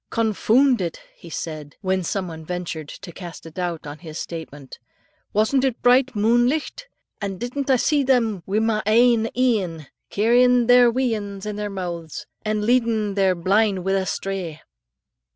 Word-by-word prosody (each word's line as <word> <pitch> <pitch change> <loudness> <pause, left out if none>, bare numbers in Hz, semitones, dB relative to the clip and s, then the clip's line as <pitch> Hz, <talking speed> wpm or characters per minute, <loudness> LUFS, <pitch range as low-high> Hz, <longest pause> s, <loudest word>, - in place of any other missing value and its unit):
"Confoond 230 +3 +2
it," 170 -2 -3 0.2
he 170 - -13
added, 155 -3 -8
when 190 -1 0
some 185 +2 -2
one 160 -1 -8
ventured 170 -3 -5
to 175 - -9
cast 175 -1 -10
a 165 - -9
doubt 175 -2 -4
on 145 +1 -8
his 160 -2 -9
statement; 150 -6 -8 0.5
"wasn't 220 +6 +2
it 260 -3 0
bright 250 +1 +4
moonlicht, 240 - +1 0.3
and 195 -2 -4
didn't 265 +3 -4
I 265 - +6
see 290 +4 +2
them 235 -7 +1
wi' 200 +2 0
my 220 -1 +1
ain 230 0 +4
een, 195 - 0 0.2
carryin' 245 +3 +4
their 245 0 +6
wee 250 0 0
anes 200 -2 -5
in 210 -1 -4
their 210 0 -3
mooths, 175 -5 -6 0.2
and 215 -1 -1
leadin' 230 -4 +1
their 190 -2 +2
blin' 195 +2 +1
wi' 195 - -1
a 190 -1 0
strae?" 185 -6 -4
210 Hz, 165 wpm, -22 LUFS, 180-240 Hz, 0.5 s, I